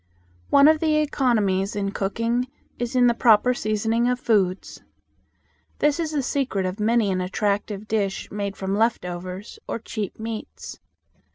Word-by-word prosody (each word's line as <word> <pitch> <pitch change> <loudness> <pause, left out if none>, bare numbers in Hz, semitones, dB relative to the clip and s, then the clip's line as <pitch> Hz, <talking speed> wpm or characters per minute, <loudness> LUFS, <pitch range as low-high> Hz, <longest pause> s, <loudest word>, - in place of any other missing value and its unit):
One 280 +1 +7
of 310 0 +5
the 310 -1 +2
economies 220 -11 +1
in 200 -1 -1
cooking 230 +6 -1 0.3
is 240 +1 -3
in 250 -1 +5
the 240 - +5
proper 235 +1 +4
seasoning 225 +2 0
of 250 0 0
foods. 195 -6 0 1.0
This 295 +2 +2
is 320 -2 -1
the 290 -3 -1
secret 255 -8 -1
of 185 +3 -4
many 220 -1 +2
an 185 -1 -1
attractive 205 +2 -2
dish 200 -3 -1
made 200 -1 -4
from 195 0 -2
left 225 -2 +1
overs, 180 +3 -7
or - - -2
cheap 215 -3 -5
meats. 220 0 -7
215 Hz, 155 wpm, -24 LUFS, 195-245 Hz, 1.0 s, One